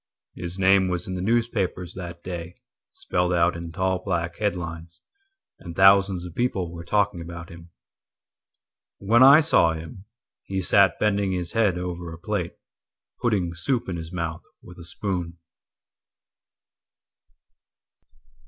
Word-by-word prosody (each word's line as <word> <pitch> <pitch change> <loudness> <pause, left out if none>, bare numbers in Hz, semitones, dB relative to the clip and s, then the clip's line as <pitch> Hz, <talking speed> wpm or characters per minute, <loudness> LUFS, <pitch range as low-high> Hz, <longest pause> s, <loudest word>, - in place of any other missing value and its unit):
His 90 +1 -6
name 95 0 +4
was 90 -1 -3
in 95 - -4
the 90 - -3
newspapers 105 -5 -1
that 85 -2 -8
daySpelled 90 0 -4
out 85 +1 +3
in 85 0 -7
tall 95 +1 0
black 85 -3 -2
headlinesAnd 85 -5 -3 0.8
thousands 95 -1 +5
of 85 - -9
people 95 -6 -1
were 85 0 -8
talking 100 0 0
about 85 +1 -8
him. 85 -1 -13 1.3
When 115 +5 +3
I 140 +4 +9
saw 115 - +4
him, 80 +4 -9 0.4
He 95 0 -4
sat 95 0 +4
bending 100 -2 +1
his 90 -2 -3
head 105 -6 +2
over 90 -1 -5
a 80 - -8
platePutting 90 +1 -4
soup 115 +9 -1
in 90 -2 -3
his 80 0 -7
mouth 85 -3 -4 0.2
with 90 0 -13
a 85 - -10
spoon. 90 -2 -3
90 Hz, 125 wpm, -24 LUFS, 85-100 Hz, 1.3 s, I